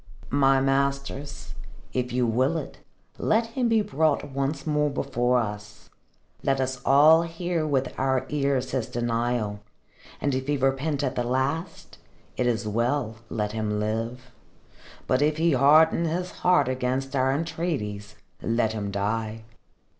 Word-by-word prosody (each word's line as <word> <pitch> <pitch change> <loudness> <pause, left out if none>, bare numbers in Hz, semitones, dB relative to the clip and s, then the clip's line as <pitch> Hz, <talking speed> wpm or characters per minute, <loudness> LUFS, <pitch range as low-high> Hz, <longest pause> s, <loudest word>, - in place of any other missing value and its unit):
"My 135 -1 +4
masters, 140 +1 -1 0.4
if 125 -1 -1
you 125 0 +1
will 130 +8 +1
it, 150 - -7 0.4
let 225 +2 +2
him 245 -1 0
be 220 -2 +3
brought 150 -3 0
once 140 +1 -2
more 150 -1 +1
before 125 -2 0
us. 105 -2 -6 0.5
Let 135 0 +1
us 130 -1 -2
all 155 +4 +6
hear 170 -1 -2
with 135 -3 0
our 130 0 +1
ears 140 -3 0
his 130 -4 -1
denial, 120 -3 -1 0.6
and 140 - 0
if 130 +1 -2
he 145 0 +1
repent 135 +2 0
at 130 -2 0
the 125 - -1
last, 130 +7 -2 0.4
it 125 - 0
is 115 -2 0
well, 115 +1 -1
let 105 -2 -2
him 105 -1 -2
live. 115 +4 -3 0.7
But 130 +2 +1
if 150 +1 +2
he 165 +1 +3
harden 155 +5 +5
his 180 +3 -2
heart 180 -7 +4
against 130 +1 -2
our 130 0 +2
entreaties, 135 - -3 0.3
let 115 -1 0
him 105 -2 -3
die. 110 +2 -2
130 Hz, 145 wpm, -26 LUFS, 120-145 Hz, 0.7 s, all